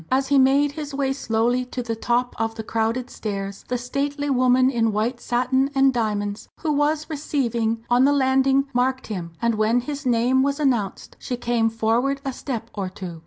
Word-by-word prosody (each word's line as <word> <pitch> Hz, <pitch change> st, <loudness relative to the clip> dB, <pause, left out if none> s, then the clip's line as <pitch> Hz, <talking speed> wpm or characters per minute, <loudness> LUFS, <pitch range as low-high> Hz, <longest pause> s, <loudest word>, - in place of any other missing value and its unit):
As 265 Hz, +1 st, +1 dB
he 280 Hz, -1 st, +5 dB
made 275 Hz, +2 st, +4 dB
his 290 Hz, -1 st, -6 dB
way 270 Hz, -1 st, 0 dB
slowly 240 Hz, -1 st, 0 dB
to 250 Hz, 0 st, -5 dB
the 230 Hz, -1 st, -3 dB
top 240 Hz, +2 st, 0 dB
of 225 Hz, 0 st, -1 dB
the 220 Hz, -, -5 dB
crowded 225 Hz, +3 st, -1 dB
stairs, 200 Hz, -2 st, -5 dB
the 250 Hz, -, -1 dB
stately 280 Hz, +4 st, -2 dB
woman 255 Hz, 0 st, +4 dB
in 225 Hz, -3 st, +1 dB
white 230 Hz, +4 st, -1 dB
satin 255 Hz, +2 st, +1 dB
and 270 Hz, 0 st, +4 dB
diamonds 205 Hz, -3 st, -2 dB
who 315 Hz, -, 0 dB
was 300 Hz, +1 st, +1 dB
"receiving" 235 Hz, -7 st, -1 dB
on 245 Hz, +1 st, +4 dB
the 285 Hz, -, +4 dB
landing 270 Hz, 0 st, +3 dB
marked 260 Hz, +1 st, 0 dB
him, 170 Hz, -3 st, -6 dB
and 235 Hz, 0 st, +3 dB
when 220 Hz, +3 st, +2 dB
his 290 Hz, +3 st, -5 dB
name 250 Hz, +1 st, +2 dB
was 280 Hz, +2 st, 0 dB
announced 240 Hz, -9 st, -1 dB
she 250 Hz, -, -4 dB
came 235 Hz, -1 st, +1 dB
forward 230 Hz, +5 st, 0 dB
a 270 Hz, -, -2 dB
step 245 Hz, -3 st, -5 dB
or 195 Hz, -3 st, -3 dB
two. 185 Hz, -3 st, -8 dB
250 Hz, 190 wpm, -23 LUFS, 225-275 Hz, -, he